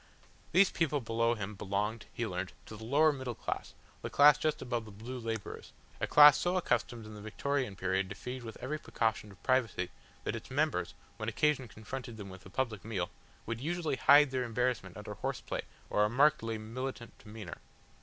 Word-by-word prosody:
These 185 +2 +6
people 150 -3 +1
below 115 0 +1
him 105 -1 -4
belonged, 105 +3 -2
he 115 - -2
learnt, 90 -2 -4
to 110 - -9
the 110 - -10
lower 150 +6 +4
middle 130 -4 -5
class, - - -4 0.3
the - - -4
class 145 0 +7
just 155 +3 0
above 120 -2 -2
the 110 - -10
blue 115 +5 -7
labourers, 115 -3 -5 0.3
a - - 0
class 150 0 +9
so 180 +1 +1
accustomed 120 -7 0
in 110 - -9
the 105 - -9
Victorian 130 +1 -2
period 95 0 0
to 95 - -6
feed 125 +4 -6
with 115 -2 -8
every 150 +5 -3
precaution 110 -6 -1
of 100 - -18
privacy 115 -9 +1 0.3
that - - -2
its - - -7
members, - - 0 0.2
when - - -2
occasion 150 -4 +1
confronted 115 +3 -7
them 100 -2 -8
with 95 0 -11
a - - -12
public 110 -1 -2
meal, 95 -6 -2 0.3
would 115 +1 -4
usually 160 -2 -1
hide 145 0 +7
their 130 -1 0
embarrassment 125 +1 -1
under - - -6
horseplay - - -3 0.3
or 105 - +2
a 105 - +3
markedly 125 -3 +3
militant 120 +2 -6
demeanour. 105 -3 -9
115 Hz, 190 wpm, -32 LUFS, 105-135 Hz, 0.3 s, class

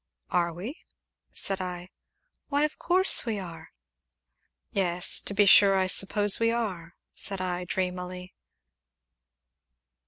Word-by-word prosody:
"Are 170 -1 +2
we?" 205 - -7 0.5
said 195 -1 -2
I. 180 0 -6 0.6
"Why, 290 0 +1
of 300 - -2
course 370 +2 +2
we 225 -3 -2
are." 165 -4 -8 1.0
"Yes 180 -1 -1
to 200 - -5
be 205 0 +5
sure 195 0 +7
I 190 - +2
suppose 200 +2 +2
we 230 0 +3
are," 190 -8 -3 0.2
said 195 -2 -4
I 180 -1 -3
dreamily. 180 0 -4
190 Hz, 120 wpm, -27 LUFS, 180-210 Hz, 1.0 s, sure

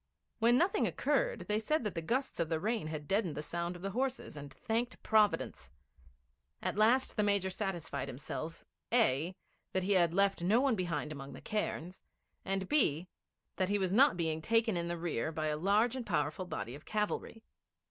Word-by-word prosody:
When 235 +2 +5
nothing 380 +8 +2
occurred, - - 0
they 210 +1 +1
said 305 +6 0
that 210 -4 -2
the 165 - -3
gusts 250 +11 -1
of 165 -2 0
the 160 -1 0
rain 215 -1 -1
had 155 -2 -5
deadened 195 -6 +1
the 150 - -4
sound 170 +3 -3
of 175 - -10
the 195 - -2
horses, 260 -1 -2
and 145 -1 -8
thanked 230 - -2
Providence. 215 -2 +2 0.9
At - - -2
last 230 +5 +3
the 215 - +2
Major 200 -2 +1
satisfied 185 -8 -3
himself 155 +5 -6 0.3
(a) 185 - +2 0.4
that 190 - +1
he 195 - 0
had 175 -3 +4
left 195 -2 +3
no 200 +7 +4
one 270 -1 +3
behind 175 -5 -2
among 140 -2 -7
the - - -9
cairns, 190 -4 -3 0.4
and 195 -1 -2
(b) 180 - +2 0.5
that 185 0 +1
he 205 - +2
was 190 -2 0
not 265 -3 +5
being 160 -2 -1
taken 225 +2 +2
in 170 0 -1
the 175 0 -2
rear 160 -4 -2
by 155 -1 -1
a 150 - 0
large 205 +9 +2
and 260 - -3
powerful 170 -3 -1
body 125 -8 -5
of 145 +3 -10
cavalry. 215 +1 -2
190 Hz, 190 wpm, -33 LUFS, 165-220 Hz, 0.9 s, When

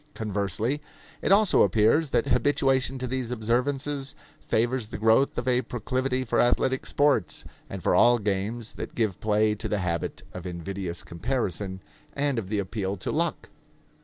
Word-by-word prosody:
Conversely; 105 +6 -1 0.4
it - - 0
also 205 0 +5
appears 110 - +3
that 120 -3 +1
habituation 135 0 +2
to 130 - -3
these 130 -1 -3
observances 135 +4 -1 0.2
favors 120 +1 0
the 100 - -6
growth 110 +5 +3
of 120 - -3
a 125 0 +3
proclivity 130 +2 -2
for 115 - 0
athletic 130 +2 +1
sports 140 - +1 0.3
and - - -7
for - - +2
all 120 0 +6
games 105 +2 -2
that - - -7
give 110 -6 0
play 105 0 +2
to 105 - -5
the 105 - 0
habit 85 -4 -2
of 90 0 -6
invidious 90 0 -5
comparison 95 -1 -3 0.3
and 145 -3 0
of 95 -4 -7
the 105 - 0
appeal 100 0 -2
to 90 - -4
luck. 165 0 -1
115 Hz, 160 wpm, -26 LUFS, 100-130 Hz, 0.4 s, all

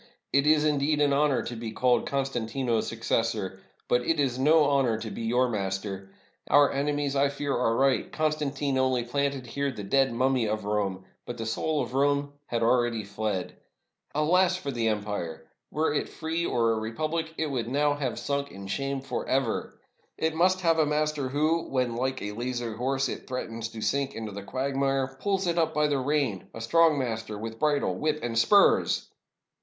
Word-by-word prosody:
It 140 +1 +3
is, 155 0 +5
indeed, 150 0 +2
an 145 -1 +3
honor 140 -2 +2
to 120 - -5
be 115 -1 -5
called 125 +2 +2
Constantino's 125 -3 -1
suc 115 0 -7
cessor, 105 -5 0 0.3
but 125 - +3
it 155 +5 0
is 130 -3 0
no 155 +3 +5
honor 135 -5 +2
to 110 -1 -6
be - - -6
your 120 +3 +2
master! 95 -2 -3 0.4
Our 145 -1 +5
ene 145 +1 0
mies, 145 -1 -1
I 140 0 +3
fear, 140 0 -2
are 115 -2 +1
right; 135 +1 +2
Constantine 145 -3 -1
only 130 -2 +2
planted 140 +1 -1
here 140 +3 -2
the 105 -5 -7
dead 135 +6 +2
mummy 130 -1 +1
of 105 -1 -2
Rome, 100 -3 -1 0.2
but 120 - -5
the 115 - -4
soul 145 +6 0
of 120 - -7
Rome 140 +1 +1
had 115 -1 -1
al 120 +2 +4
ready 115 -2 -2
fled. 100 -2 -3 0.6
Alas 180 +5 +3
for 145 -7 -4
the 115 -3 -1
empire! 105 -6 -3 0.2
Were 155 0 0
it 150 - -1
free 165 +1 -2
or 115 -1 +2
a 110 - 0
repub 115 +9 -3
lic, 160 -1 -2
it 155 -2 -1
would 120 -4 -2
now 145 +3 +2
have 140 -5 -3
sunk 140 0 -2
in 100 0 -9
shame 135 +7 -2
forever. 135 -2 -2 0.4
It 160 0 0
must 185 +3 +2
have 165 -2 +3
a 155 - +4
master, 150 -2 0
who, 155 +4 +1
when, 125 -3 0
like 130 +2 -2
a 105 - -3
lazy 120 +1 -3
horse, 135 +4 0
it - - -6
threatens 115 -3 -4
to 115 -1 -8
sink 140 +3 0
into 110 -2 -5
the 100 +1 -6
quagmire, 135 +3 -1
pulls 195 -1 0
it 170 -1 +1
up 160 -1 +1
by 150 0 +3
the 145 -2 +1
rein; 130 -7 -1
a 115 - -6
strong 160 +6 +4
master 110 -5 -3
with 115 +1 -6
bridle, 150 -2 +1
whip, 155 0 -1
and 120 -1 -2
spurs!" 200 - +4
135 Hz, 195 wpm, -27 LUFS, 115-145 Hz, 0.6 s, is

